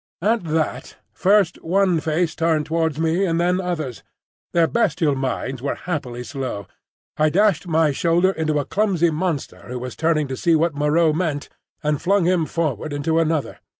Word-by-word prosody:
At 220 -2 +1
that, 160 -1 -2 0.2
first 195 -2 +2
one 185 0 +2
face 160 +2 0
turned 160 -2 +1
towards 160 -2 0
me 165 +4 +1
and 165 -3 +1
then 180 +2 +2
others. 155 - -4 0.5
Their 170 -1 +4
bestial 160 -7 +1
minds 130 -1 -3
were 140 - -2
happily 130 -8 -4
slow. 130 -7 -5 0.5
I 155 0 +3
dashed 190 0 +2
my 160 -2 +3
shoulder 170 +6 +2
into 155 -4 -1
a 145 - -1
clumsy 185 -4 +1
monster 160 -2 -3
who 125 - -5
was 125 0 -6
turning 160 -2 +1
to 130 - -3
see 165 +5 +2
what 165 +1 +2
Moreau 150 +2 +2
meant, 155 -4 -2 0.3
and 150 -1 0
flung 195 -1 +2
him 175 -3 +2
forward 155 -3 -2
into 160 +3 0
another. 160 -3 -1
160 Hz, 170 wpm, -21 LUFS, 150-175 Hz, 0.5 s, Their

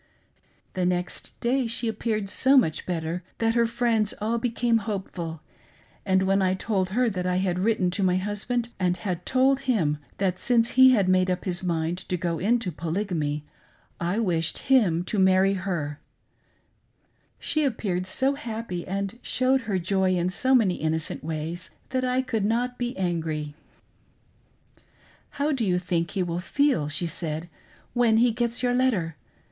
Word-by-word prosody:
The 185 - -1
next 180 0 -3
day 250 +1 +1
she 230 +1 -1
appeared 215 -1 -1
so 265 +7 +3
much 160 -12 +2
better 170 0 -2 0.2
that 225 0 +1
her 235 0 +3
friends 230 -3 0
all 225 +3 0
became 235 -1 +1
hopeful, 190 -6 -5 0.7
and 190 0 +3
when 195 +1 +2
I 185 0 +2
told 190 -2 -1
her 245 +5 +2
that 180 -2 -2
I 180 - +1
had 180 -1 0
written 190 -3 +1
to 195 +2 -1
my 180 -1 +3
husband 210 +5 -2
and 180 -1 +1
had 180 -4 -4
told 265 +1 +3
him, 155 -11 +2 0.2
that 185 -2 0
since 235 -1 +2
he 260 0 +7
had 210 -7 +3
made 185 0 +3
up 180 0 -2
his 180 -2 -2
mind 170 -1 -1
to 180 - 0
go 170 -1 -2
into 225 0 +1
Polygamy, 160 -3 -2 0.5
I 175 +4 -1
wished 175 +1 -1
him 180 -10 +4
to 205 +3 -2
marry 190 +1 +4
her, 170 -7 -3 1.4
she 310 - 0
appeared 195 -9 -1
so 265 +7 +1
happy 225 -10 -5
and 195 +4 -3
showed 260 +1 +2
her 195 - +1
joy 185 +1 +1
in 175 0 +1
so 260 +8 +2
many 205 -8 +3
innocent 160 0 -2
ways 160 +3 -4 0.2
that 260 -1 0
I 255 +1 +1
could 225 -5 -1
not 245 +4 0
be 245 0 -3
angry. 160 -5 -2 1.0
" - - -33
How 290 +2 +1
do 265 -5 0
you 180 -4 +2
think 175 -1 -1
he 190 -3 -1
will 170 -1 -2
feel," 265 - +1
she 150 +4 -1
said, 165 0 -4 0.2
" - - -30
when 235 -3 +3
he 240 +1 +4
gets 235 +1 -2
your 245 0 +2
letter.' 220 - +1
190 Hz, 170 wpm, -26 LUFS, 175-235 Hz, 1.4 s, he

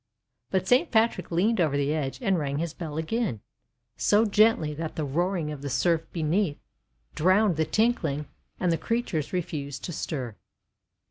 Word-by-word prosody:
But 190 0 0
Saint 260 +7 +4
Patrick 225 0 +2
leaned 190 +5 +2
over 150 -4 +2
the 145 +1 +1
edge, 140 -4 -2
and 190 -3 +2
rang 140 -2 -2
his 165 0 -2
bell 155 -3 -6
again, 170 - -1 0.6
so 210 +2 +4
gently 210 -7 +3
that 160 +1 -5
the 155 - -2
roaring 170 +2 -1
of 145 -2 -7
the 140 - -4
surf 160 +5 +1
beneath 165 0 0 0.6
drowned 185 +3 +3
the 160 +1 +1
tinkling, 160 - +1 0.3
and 180 -2 +1
the 165 - 0
creatures 215 - -2
refused 145 -6 -4
to 175 - -4
stir. 130 -9 -4
165 Hz, 160 wpm, -27 LUFS, 150-200 Hz, 0.6 s, Saint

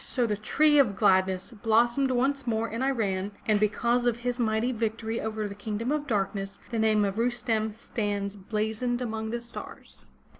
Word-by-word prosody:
So 250 -3 0
the 210 -2 0
tree 295 +8 +3
of 225 -8 +4
gladness 190 -1 +2
blossomed 235 +4 +2
once 265 +1 0
more 225 0 0
in 230 +2 -4
Iran, 205 -7 0
and 215 -2 +3
because 235 +4 +1
of 235 -1 +2
his 245 0 -1
mighty 225 +1 +1
victory 225 -1 -2
over 215 -1 -2
the 200 - -7
Kingdom 210 +4 -3
of 300 -1 -1
Darkness 195 -3 -1
the 230 - -1
name 215 -1 +3
of 200 +2 -2
Rustem 230 -2 0
stands 205 -3 -3
blazoned 220 +4 -2
among 220 -3 -3
the 235 +1 -3
stars. 235 0 -10
220 Hz, 175 wpm, -28 LUFS, 210-240 Hz, -, of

